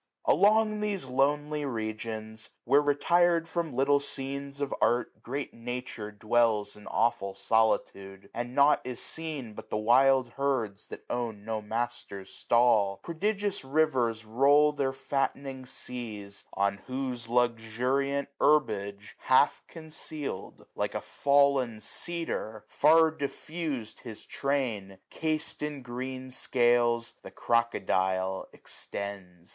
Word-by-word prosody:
700 -, -, +5 dB
Along 215 Hz, +1 st, +4 dB
these 205 Hz, -6 st, -1 dB
lonely 145 Hz, +3 st, +1 dB
regions, 110 Hz, -3 st, -4 dB
where 140 Hz, +4 st, +5 dB
rctir'd 165 Hz, +4 st, +3 dB
From 165 Hz, -1 st, -2 dB
little 140 Hz, +3 st, +3 dB
scenes 140 Hz, 0 st, -4 dB
of 140 Hz, -1 st, -2 dB
art, 120 Hz, +1 st, +1 dB
great 140 Hz, +3 st, -4 dB
Nature 120 Hz, -2 st, -5 dB
dwells 110 Hz, -1 st, +1 dB
In 105 Hz, -, -14 dB
aweful 115 Hz, -4 st, 0 dB
solitude; 100 Hz, -3 st, 0 dB
and 120 Hz, +1 st, -4 dB
nought 145 Hz, +1 st, +5 dB
is 125 Hz, -1 st, -4 dB
seen 150 Hz, -6 st, -4 dB
But -, -, -10 dB
the -, -, -1 dB
wild 130 Hz, +3 st, +4 dB
herds 120 Hz, -7 st, -2 dB
that -, -, -10 dB
own 115 Hz, -4 st, -3 dB
no 110 Hz, -1 st, -2 dB
master's 110 Hz, -3 st, -4 dB
stall; 110 Hz, -5 st, +3 dB
Prodigious 200 Hz, +3 st, -1 dB
rivers 130 Hz, -6 st, +1 dB
roll 140 Hz, +6 st, +5 dB
their 140 Hz, -2 st, -1 dB
fattening 135 Hz, -1 st, -3 dB
seas; 110 Hz, -6 st, -6 dB
705 100 Hz, -, 0 dB
On 100 Hz, 0 st, +1 dB
whose 130 Hz, -3 st, -3 dB
luxuriant 125 Hz, +4 st, +1 dB
herbage, 105 Hz, -9 st, +1 dB
half 130 Hz, +2 st, +3 dB
conceal'd. 155 Hz, -, -6 dB
Like -, -, -2 dB
a -, -, -1 dB
fall'n 140 Hz, -5 st, +2 dB
cedar, 115 Hz, -5 st, -3 dB
far 160 Hz, +2 st, +5 dB
diffus'd 150 Hz, -4 st, -4 dB
his 115 Hz, -4 st, -7 dB
train, 115 Hz, -9 st, -2 dB
Cas'd 160 Hz, 0 st, -1 dB
in 150 Hz, -3 st, -4 dB
green 130 Hz, +1 st, -6 dB
scales, 120 Hz, -2 st, +2 dB
the -, -, -9 dB
crocodile 95 Hz, -5 st, 0 dB
extends. 95 Hz, -4 st, -6 dB
125 Hz, 120 wpm, -29 LUFS, 110-145 Hz, -, 700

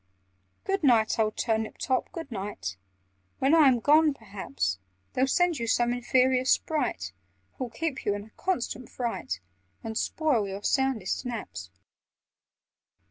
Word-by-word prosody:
"Good 390 Hz, 0 st, 0 dB
night, 230 Hz, -6 st, +3 dB
old 215 Hz, -1 st, +1 dB
Turnip 220 Hz, -2 st, -1 dB
top, 260 Hz, -1 st, -1 dB
good 330 Hz, -7 st, -7 dB
night! 190 Hz, -, -4 dB, 0.6 s
When 270 Hz, +3 st, +2 dB
I 320 Hz, -3 st, +7 dB
am 250 Hz, -2 st, +4 dB
gone, 300 Hz, +3 st, +5 dB
perhaps 140 Hz, -, -3 dB, 0.3 s
They'll 260 Hz, +1 st, +2 dB
send 345 Hz, +1 st, +2 dB
you 230 Hz, -, -2 dB
some 240 Hz, +1 st, +2 dB
inferior 255 Hz, +1 st, +2 dB
Sprite, 255 Hz, -, 0 dB, 0.5 s
Who'll 255 Hz, -, -2 dB
keep 295 Hz, +5 st, -3 dB
you 205 Hz, -, +1 dB
in 205 Hz, -, -5 dB
a 220 Hz, -, -17 dB
constant 255 Hz, -, -3 dB
fright 230 Hz, -, -3 dB, 0.4 s
And 220 Hz, 0 st, -5 dB
spoil 260 Hz, -6 st, +1 dB
your 195 Hz, +1 st, -6 dB
soundest 265 Hz, -8 st, 0 dB
naps. 210 Hz, -, -6 dB
240 Hz, 135 wpm, -28 LUFS, 210-270 Hz, 0.6 s, I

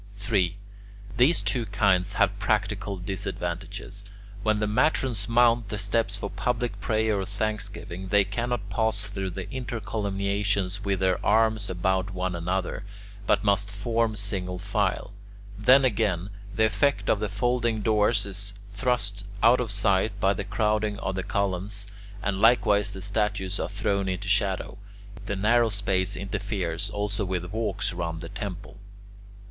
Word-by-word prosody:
3. 100 Hz, -3 st, 0 dB, 0.6 s
These 140 Hz, +8 st, +4 dB
two 120 Hz, -4 st, 0 dB
kinds 100 Hz, -1 st, +2 dB
have 100 Hz, 0 st, +2 dB
practical 105 Hz, -1 st, 0 dB
disadvantages. 95 Hz, +2 st, -4 dB, 0.4 s
When 110 Hz, -1 st, +2 dB
the 105 Hz, -, 0 dB
matrons 120 Hz, -2 st, +1 dB
mount 120 Hz, -1 st, +4 dB
the 105 Hz, -, -3 dB
steps 105 Hz, +3 st, +1 dB
for 100 Hz, -, -5 dB
public 120 Hz, +5 st, -2 dB
prayer 110 Hz, -2 st, +1 dB
or 95 Hz, -, -2 dB
thanksgiving, 100 Hz, -3 st, -4 dB
they 100 Hz, +1 st, +4 dB
cannot 115 Hz, +2 st, -2 dB
pass 110 Hz, 0 st, +1 dB
through 100 Hz, -2 st, -4 dB
the 90 Hz, -, -5 dB
intercolumniations 100 Hz, -4 st, -1 dB
with 100 Hz, -2 st, -1 dB
their 95 Hz, -1 st, +1 dB
arms 110 Hz, 0 st, +3 dB
about 95 Hz, +1 st, 0 dB
one 90 Hz, 0 st, -1 dB
another, 90 Hz, +4 st, -2 dB, 0.4 s
but -, -, +3 dB
must 100 Hz, -1 st, +2 dB
form 115 Hz, +2 st, 0 dB
single 95 Hz, -3 st, -1 dB
file; 100 Hz, 0 st, -1 dB, 0.4 s
then 130 Hz, +6 st, +6 dB
again, 105 Hz, -5 st, 0 dB, 0.2 s
the 110 Hz, -, +4 dB
effect 110 Hz, +6 st, +1 dB
of 105 Hz, -, +3 dB
the 105 Hz, -1 st, -2 dB
folding 115 Hz, +1 st, 0 dB
doors 105 Hz, -1 st, +2 dB
is 100 Hz, 0 st, -5 dB
thrust 105 Hz, -2 st, 0 dB, 0.2 s
out 120 Hz, +2 st, +6 dB
of 120 Hz, -3 st, -1 dB
sight 100 Hz, 0 st, +1 dB
by 100 Hz, 0 st, +3 dB
the 100 Hz, -, -3 dB
crowding 105 Hz, 0 st, 0 dB
of 95 Hz, -, -3 dB
the 95 Hz, -, -2 dB
columns, 100 Hz, +1 st, -1 dB, 0.4 s
and 100 Hz, -1 st, -1 dB
likewise 110 Hz, -3 st, +4 dB
the 95 Hz, -, -6 dB
statues 100 Hz, -1 st, -1 dB
are -, -, -2 dB
thrown 100 Hz, -2 st, 0 dB
into 95 Hz, +1 st, -3 dB
shadow; 95 Hz, -1 st, 0 dB, 0.5 s
the 100 Hz, -, -1 dB
narrow 115 Hz, +4 st, +3 dB
space 100 Hz, -2 st, +1 dB
interferes 100 Hz, -2 st, -2 dB
also 105 Hz, 0 st, -2 dB
with 90 Hz, 0 st, -3 dB
walks 110 Hz, -4 st, -1 dB
round 85 Hz, -2 st, -3 dB
the 85 Hz, -, -7 dB
temple. 95 Hz, 0 st, -7 dB
100 Hz, 145 wpm, -26 LUFS, 95-110 Hz, 0.6 s, then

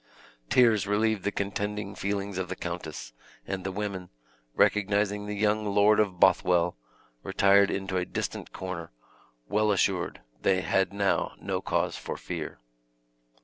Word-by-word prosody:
Tears 115 Hz, -5 st, +4 dB
relieved 105 Hz, 0 st, +1 dB
the 100 Hz, -, 0 dB
contending 100 Hz, 0 st, -3 dB
feelings 100 Hz, -1 st, -3 dB
of 90 Hz, -1 st, -3 dB
the 90 Hz, -, -3 dB
countess; 80 Hz, -9 st, -6 dB, 0.3 s
and 95 Hz, -1 st, -4 dB
the 95 Hz, -, -3 dB
women, 95 Hz, -2 st, -4 dB, 0.5 s
recognizing 105 Hz, 0 st, +2 dB
the 105 Hz, -, -3 dB
young 105 Hz, +1 st, +1 dB
Lord 105 Hz, +1 st, +4 dB
of 95 Hz, -4 st, +1 dB
Bothwell, 90 Hz, -1 st, +4 dB, 0.5 s
retired 100 Hz, +5 st, +4 dB
into 95 Hz, -1 st, -2 dB
a 90 Hz, -, 0 dB
distant -, -, -4 dB
corner, 90 Hz, -3 st, -6 dB, 0.6 s
well 105 Hz, -, +2 dB
assured 100 Hz, -, 0 dB, 0.2 s
they 95 Hz, -1 st, +2 dB
had 95 Hz, 0 st, +1 dB
now 100 Hz, -1 st, 0 dB
no -, -, -2 dB
cause -, -, -1 dB
for -, -, -5 dB
fear. -, -, -5 dB
100 Hz, 140 wpm, -28 LUFS, 95-105 Hz, 0.6 s, Tears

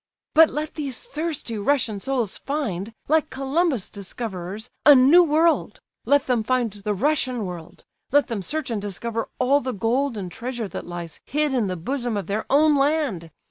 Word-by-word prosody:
"But 320 Hz, +1 st, +7 dB
let 305 Hz, 0 st, -4 dB
these 280 Hz, -5 st, -4 dB
thirsty 310 Hz, -, -4 dB
Russian 225 Hz, -3 st, +1 dB
souls 245 Hz, -3 st, -1 dB
find, 230 Hz, -, -3 dB, 0.2 s
like 310 Hz, +1 st, +2 dB
Columbus' 275 Hz, -, 0 dB
discoverers, 200 Hz, 0 st, -6 dB
a 290 Hz, +1 st, +9 dB
new 280 Hz, +8 st, +7 dB
world; 325 Hz, +1 st, +2 dB, 0.3 s
let 285 Hz, -1 st, +3 dB
them 245 Hz, -3 st, +1 dB
find 245 Hz, 0 st, 0 dB
the 205 Hz, +1 st, -3 dB
Russian 255 Hz, -1 st, 0 dB
world, 175 Hz, -2 st, -9 dB, 0.3 s
let 290 Hz, 0 st, +4 dB
them 230 Hz, -5 st, -4 dB
search 290 Hz, -, -3 dB
and 215 Hz, -3 st, -2 dB
discover 225 Hz, +3 st, -4 dB
all 280 Hz, +3 st, +3 dB
the 255 Hz, 0 st, -3 dB
gold 235 Hz, +5 st, 0 dB
and 185 Hz, -3 st, -5 dB
treasure 240 Hz, 0 st, -4 dB
that -, -, -7 dB
lies 175 Hz, -2 st, -7 dB
hid 300 Hz, 0 st, 0 dB
in 240 Hz, -6 st, +1 dB
the 185 Hz, -, -2 dB
bosom 240 Hz, +4 st, -2 dB
of 200 Hz, -, -3 dB
their 210 Hz, +2 st, -3 dB
own 300 Hz, +2 st, +5 dB
land! 275 Hz, -, 0 dB
250 Hz, 175 wpm, -23 LUFS, 205-290 Hz, 0.3 s, a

